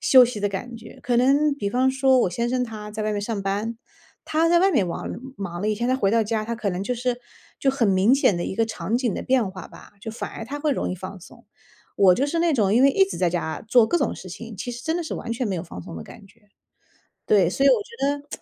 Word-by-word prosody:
休 255 -2 +7
息 230 -4 -4
的 205 - +1
感 235 +5 -6
觉。 225 - -13
可 245 -1 +1
能 280 +4 +3
比 205 -8 -3
方 255 +2 +2
说， 265 -1 +3
我 180 - +1
先 235 +6 -1
生 250 0 0
他 210 -2 -8
在 215 0 -4
外 215 0 -1
面 205 - -2
上 205 -1 -3
班， 205 +4 -2 0.5
他 320 +2 +1
在 345 0 +5
外 385 +2 +4
面 200 - +2
王 - - -5 0.3
忙 175 -3 -5
了 210 - -1
一 215 - +1
天， 235 +3 -2
他 255 - +3
回 200 -6 +1
到 225 0 +3
家， 215 0 -1
他 235 +1 -3
可 210 -3 -2
能 180 +2 -3
就 250 +5 -2
是 245 0 -2 0.4
就 270 - +2
很 255 -5 +1
明 195 +7 +4
显 250 -8 +3
的 175 - -2
一 - - -4
个 225 +2 +2
场 220 0 -2
景 245 -5 0
的 - - -4
变 250 -6 +1
化 185 -2 -10
吧， - - -15
就 220 +2 -6
反 225 - -6
而 225 - -7
他 285 +5 -6
会 295 -1 +1
容 - - -2
易 - - -2
放 185 +1 -8
松。 - - -16 0.5
我 190 -3 +6
就 275 +7 0
是 330 +3 -2
那 335 -1 +2
种 210 -5 +2
因 250 - +5
为 275 - +6
一 385 +7 +4
直 385 - -6
在 180 -2 +2
家 160 -2 -3
做 235 -2 +5
各 345 - +1
种 280 - 0
事 185 - -10
情， 225 +3 -9
其 245 - -5
实 240 +1 -8
真 320 +4 -1
的 350 - -2
是 320 - -5
完 - - -6
全 235 0 -2
没 195 - -2
有 165 - -3
放 90 - -9
松 - - -9
的 80 - -6
感 200 - -14
觉。 205 +1 -26 0.8
对， 195 -5 +4
所 270 +8 0
以 - - +8
我 455 -4 +4
觉 290 -12 -2
得 290 - -30
230 Hz, 310 characters per minute, -23 LUFS, 200-265 Hz, 0.8 s, 以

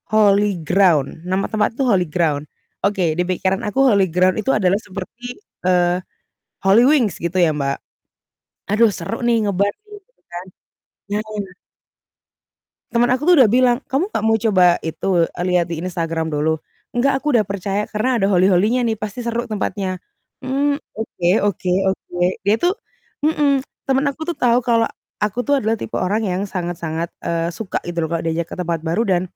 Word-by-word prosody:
Holy 205 -2 +3
Ground. 165 -4 +2
Nama 190 +1 0
tempat 220 +1 0
itu 275 - +1
Holy 190 -7 +2
Ground. 150 -3 -1 0.3
Oke, 185 -5 +1
di 170 - -1
pikiran 190 +1 0
aku 265 +6 +2
Holy 200 -7 +4
Ground 185 +4 +2
itu 265 - -3
adalah 195 -1 +2
seperti, 230 +6 -8 0.3
eee, 180 0 +2 0.6
Holywings, 230 - +4
gitu 170 +2 -4
ya, 175 -3 +4
Mbak. 140 -2 -1 0.9
"Aduh, 215 +2 +3
seru 200 +5 -5
nih, 230 -3 +2
nge-bar 200 0 +1 0.2
nih." 420 - -13
Gitu - - -43
kan. 175 +1 -6 0.6
Nah 210 -2 -4 1.4
Temen 240 +1 +3
aku 255 +3 0
tuh 355 +3 +6
udah 255 - +7
bilang, 245 +2 +3
"Kamu 330 +11 -1
gak - - -1
mau 225 - +4
coba 190 -6 +4
itu, 170 +2 0
e 170 - -4
lihat 175 -2 +1
di 165 - -3
Instagram 165 -2 -2
dulu?" 160 +1 0 0.3
"Enggak, 270 +3 +1
aku 300 - +1
udah 220 -6 +2
percaya. 200 +1 -2
Karena 235 +3 0
ada 195 - +2
holy-holy-nya 200 +5 +3
nih, 225 -2 -1
pasti 215 +3 -5
seru 235 +1 -2
tempatnya." 195 -3 -2 0.5
"Mmm, 280 +2 +1 0.2
oke 180 -5 -2
oke 190 -3 -1 0.2
oke." 185 -2 -3 0.2
Dia 200 +2 +3
tuh 360 +3 +1 0.5
mhm. 290 -3 +2 0.2
Temen 270 0 +2
aku 300 +3 -7
tuh 345 - -2
tahu 245 0 +3
kalau 230 -1 +3 0.4
aku 210 +3 -1
tuh 285 - +4
adalah 220 +1 +1
tipe - - -6
orang 210 +5 0
yang 185 0 -1
sangat-sangat, 170 -3 -3 0.2
eee, 165 0 -1
suka 195 +1 -3
gitu 170 -1 -2
loh - - -6
kalau 165 -1 -1
diajak 165 +1 -1
ke - - -5
tempat 170 -2 -1
baru 170 +7 0
dan 180 -2 +2
200 Hz, 170 wpm, -20 LUFS, 175-235 Hz, 1.4 s, udah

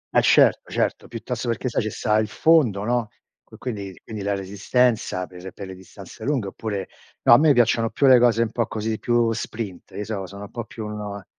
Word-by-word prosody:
Eh, - - +6
certo, - - +4
certo, - - -1
piuttosto 120 +1 -5
perché 120 +2 -1
sai - - 0
ci 110 - -2
sta 105 +1 +1
il 110 - 0
fondo, 120 -5 +3
no, 120 0 0 0.4
qui - - -15
quindi 100 -7 -6
quindi 110 -2 -7
la 100 0 -1
resistenza 100 +1 0
per 90 +1 -10
per 100 - -8
le 95 - -8
distanze 95 0 -12
lunghe 130 -8 -1
oppure 100 -2 -4 0.4
no, - - +7
a 120 - +8
me 155 0 +5
piacciono 115 -2 +3
più 140 - 0
le 130 -2 +8
cose 115 -1 +4
un 110 - -3
po' 115 -1 -1
così, 110 -1 -3
più 120 -1 +2
sprint, 110 -4 -5
io 105 - -3
so 100 -3 -4
sono 100 +2 -9
un 100 - -10
po' 115 -2 -5
più 110 -1 -8
uno 105 -2 -6
110 Hz, 215 wpm, -23 LUFS, 100-120 Hz, 0.4 s, a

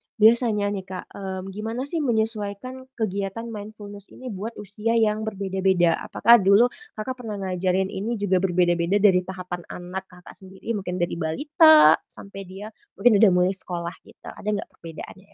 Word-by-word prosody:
biasanya 220 -2 +3
nih 195 -2 -4
Kak, 185 -1 -6
mmm, 190 -1 -6
gimana 225 +5 -4
sih 315 +4 -3
menyesuaikan 225 0 -2
kegiatan 200 0 -3
mindfulness 205 -1 -9
ini 255 -1 -8
buat 215 +4 -6
usia 210 +3 -2
yang 220 -1 +1
berbeda-beda? 190 -4 +1
Apakah 235 0 +5
dulu, 200 +5 +5 0.2
Kakak 255 +4 -5
pernah 220 -4 -5
ngajarin 190 0 -1
ini 220 +5 -3
juga 200 -3 +1
berbeda-beda 175 0 +1
dari 190 -3 +4
tahapan 180 -1 -6
anak 185 +2 -7
Kakak 180 -1 -15
sendiri, 190 +3 -8
mungkin 195 -5 -3
dari 175 -1 -2
balita 305 - +5
sampai 195 0 -10
dia 195 +4 -9 0.2
mungkin 225 -4 +4
udah 215 -4 +6
mulai 180 +1 +3
sekolah 175 -3 -3 0.2
gitu, - - -12
ada - - -12
nggak 200 - -6
perbedaannya 170 +4 -11
200 Hz, 155 wpm, -24 LUFS, 185-220 Hz, 0.2 s, udah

